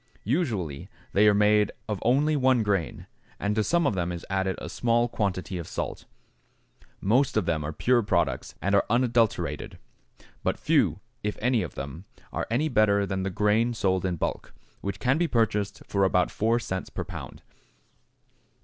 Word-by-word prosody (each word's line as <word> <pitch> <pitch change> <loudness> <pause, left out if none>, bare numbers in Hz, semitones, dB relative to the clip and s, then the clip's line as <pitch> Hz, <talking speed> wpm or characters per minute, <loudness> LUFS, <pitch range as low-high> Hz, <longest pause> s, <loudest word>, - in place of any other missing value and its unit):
Usually 105 - -1 0.2
they 105 +2 +5
are 105 - +6
made 105 0 +4 0.2
of 105 -3 -2
only 145 +6 +3
one 130 -4 +3
grain, 100 -6 -1 0.3
and 100 +1 0
to 110 0 +1
some 170 +7 +2
of 140 - +2
them 90 -2 -1
is 85 -1 -6
added 95 0 0
a - - -6
small 120 0 +1
quantity 95 -5 -2
of 85 - -7
salt. - - -4 0.9
Most 125 +5 +2
of 105 - +2
them 80 -3 0
are 75 - -3
pure 120 +9 +2
products 95 -5 -1
and 100 - +1
are 100 - +5
unadulterated, 120 -1 +1 0.6
but - - 0
few, - - +2 0.2
if 105 0 -3
any 120 0 +2
of 85 -8 -6
them, 70 +7 -7 0.3
are - - -2
any 130 +7 +1
better 105 -6 +3
than 95 -1 -2
the 95 - -1
grain 105 +5 +2
sold 95 -4 +1
in 90 -2 0
bulk, 80 - -4 0.3
which 100 - -3
can 135 +4 +2
be 175 - +2
purchased 105 -6 0
for 100 -1 0
about 90 -1 +2
4 115 +2 +1
cents 95 -5 -4
per - - -4
pound. - - -9
105 Hz, 175 wpm, -27 LUFS, 95-120 Hz, 0.9 s, are